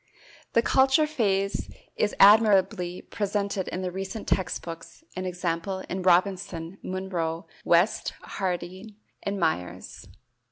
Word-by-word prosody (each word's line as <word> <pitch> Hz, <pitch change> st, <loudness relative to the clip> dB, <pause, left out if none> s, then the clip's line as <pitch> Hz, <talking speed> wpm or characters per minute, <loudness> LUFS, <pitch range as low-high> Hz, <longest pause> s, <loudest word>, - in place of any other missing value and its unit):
The 230 Hz, -, +4 dB
culture 265 Hz, +5 st, +4 dB
phase 200 Hz, -9 st, 0 dB, 0.3 s
is 210 Hz, -, 0 dB
admirably 200 Hz, -3 st, +5 dB
presented 200 Hz, -2 st, -2 dB
in 185 Hz, -, -4 dB
the 180 Hz, -, -2 dB
recent 195 Hz, +3 st, -5 dB
text 190 Hz, -, 0 dB
books, 165 Hz, -, -9 dB
e. 185 Hz, 0 st, -3 dB
g., 180 Hz, 0 st, -2 dB, 0.4 s
in 190 Hz, -, -3 dB
Robinson, 180 Hz, -1 st, +1 dB
Munro, 175 Hz, -3 st, -3 dB, 0.2 s
West, 175 Hz, +5 st, +2 dB
Harding, 185 Hz, +3 st, -4 dB, 0.3 s
and 200 Hz, 0 st, -3 dB
Myers. 125 Hz, -, -3 dB
190 Hz, 115 wpm, -26 LUFS, 180-205 Hz, 0.4 s, admirably